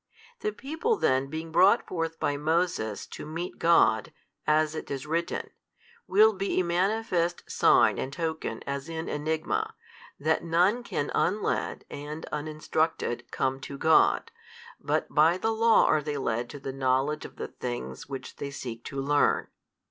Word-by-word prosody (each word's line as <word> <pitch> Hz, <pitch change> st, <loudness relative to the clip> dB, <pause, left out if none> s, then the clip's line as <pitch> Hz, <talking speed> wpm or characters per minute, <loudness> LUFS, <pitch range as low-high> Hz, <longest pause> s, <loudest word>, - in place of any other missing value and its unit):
The 210 Hz, -, -1 dB
people 320 Hz, -, -1 dB
then 130 Hz, -, +2 dB
being 160 Hz, +3 st, -6 dB
brought 185 Hz, +5 st, +5 dB
forth 165 Hz, -2 st, -3 dB
by 145 Hz, -, 0 dB
Moses 155 Hz, -, 0 dB
to -, -, -9 dB
meet 165 Hz, +4 st, -5 dB
God, 110 Hz, -10 st, +4 dB, 0.4 s
as 155 Hz, 0 st, +3 dB
it 155 Hz, -, -6 dB
is 135 Hz, 0 st, -4 dB
written, 165 Hz, +2 st, -2 dB, 0.6 s
will 215 Hz, +3 st, +6 dB
be 195 Hz, -1 st, -1 dB
a -, -, +3 dB
manifest 175 Hz, -1 st, 0 dB
sign -, -, +4 dB
and 130 Hz, -, -3 dB
token 160 Hz, -7 st, -3 dB
as 140 Hz, +3 st, -4 dB
in 165 Hz, 0 st, -4 dB
enigma, 155 Hz, +1 st, -2 dB, 0.4 s
that 155 Hz, +2 st, +1 dB
none 180 Hz, +8 st, +3 dB
can 145 Hz, -11 st, -3 dB
unled 205 Hz, +4 st, 0 dB
and 150 Hz, +2 st, -6 dB
uninstructed 155 Hz, -3 st, -2 dB
come 135 Hz, 0 st, -1 dB
to 140 Hz, +1 st, -7 dB
God, 160 Hz, +3 st, +4 dB, 0.5 s
but -, -, 0 dB
by 160 Hz, +4 st, +5 dB
the 225 Hz, +4 st, 0 dB
law 225 Hz, 0 st, +5 dB
are 155 Hz, -, +3 dB
they 150 Hz, -1 st, -3 dB
led 120 Hz, -2 st, -1 dB
to 145 Hz, -, -8 dB
the 135 Hz, -1 st, -5 dB
|298 -, -, -11 dB
knowledge 135 Hz, +3 st, +1 dB
of -, -, -10 dB
the -, -, -5 dB
things 120 Hz, +2 st, -6 dB
which 135 Hz, -2 st, -7 dB
they 140 Hz, -, -4 dB
seek 120 Hz, -4 st, -7 dB
to 140 Hz, -, -5 dB
learn. 145 Hz, +2 st, +2 dB
155 Hz, 160 wpm, -28 LUFS, 140-175 Hz, 0.6 s, will